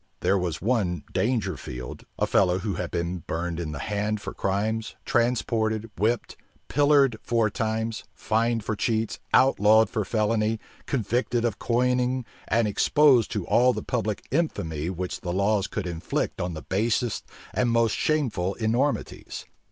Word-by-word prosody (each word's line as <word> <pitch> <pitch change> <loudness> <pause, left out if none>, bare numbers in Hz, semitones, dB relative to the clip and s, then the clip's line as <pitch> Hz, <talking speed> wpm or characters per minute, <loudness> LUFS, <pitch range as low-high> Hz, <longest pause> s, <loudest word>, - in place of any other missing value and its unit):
There 100 - +3
was 85 -2 -3
one 100 - 0
Dangerfield, 95 - -2
a - - +2
fellow 90 -2 +3
who 100 +1 -2
had - - -3
been 85 +1 -2
burned 85 +1 -3
in 80 -3 -3
the 75 - -5
hand 105 +5 -1
for - - -6
crimes, 110 +3 -1
transported, 115 -2 0
whipped, 110 +5 0 0.3
pilloried 145 -4 +4
four 115 -3 +1
times, 110 +1 -2
fined 115 0 0
for 110 - -2
cheats, 110 +1 -1
outlawed 110 -4 +5
for 110 - 0
felony, 110 +1 0 0.3
convicted 120 0 0
of 115 -4 -1
coining, 125 +1 +1 0.2
and 115 0 +2
exposed 130 +3 +4
to 105 -6 -2
all 125 +1 +4
the - - -4
public 110 -4 -2
infamy 85 - -1
which 90 0 -4
the 90 - -3
laws 100 +2 +1
could 105 - -4
inflict 85 -2 -2
on 90 -1 -3
the 80 - -7
basest 115 +3 0 0.3
and 125 - +1
most 115 -2 +2
shameful 115 - 0
enormities. 120 +6 -1
110 Hz, 145 wpm, -26 LUFS, 95-120 Hz, 0.3 s, outlawed